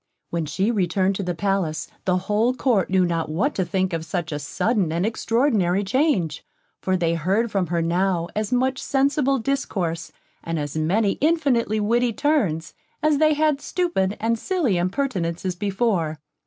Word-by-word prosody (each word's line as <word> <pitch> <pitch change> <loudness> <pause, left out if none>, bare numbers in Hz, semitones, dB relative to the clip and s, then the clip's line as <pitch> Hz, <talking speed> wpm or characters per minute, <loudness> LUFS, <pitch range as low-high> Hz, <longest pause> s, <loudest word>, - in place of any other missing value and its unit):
When 165 -2 -2
she 190 +9 0
returned 190 -2 +1
to - - -3
the 180 -2 -2
palace, 185 -4 -1 0.2
the 185 -1 +2
whole 210 +6 +1
Court 235 -9 +1
knew 185 -1 +3
not 165 -2 -1
what 205 - 0
to 190 - 0
think 185 0 -1
of 165 -1 -2
such 170 -1 -3
a 145 - -3
sudden 180 - 0
and 170 +3 0
extraordinary 220 -4 +1
change; 195 - 0 0.4
for 185 0 +1
they 170 -2 +1
heard 195 +8 0
from 195 -3 0
her 170 0 0
now 175 0 +1
as 215 +2 -2
much 260 +1 +1
sensible 275 0 +2
discourse, 195 -10 -2 0.3
and 165 0 -3
as 145 -1 -4
many 195 +7 +1
infinitely 275 -9 +2
witty 235 +3 +1
turns, 210 - 0 0.3
as 305 -2 +3
they 310 -1 +4
had 300 -1 +1
stupid 275 - -1
and 230 +1 0
silly 330 - 0
impertinences 185 -3 -1
before. 190 -5 0
195 Hz, 165 wpm, -23 LUFS, 170-245 Hz, 0.4 s, they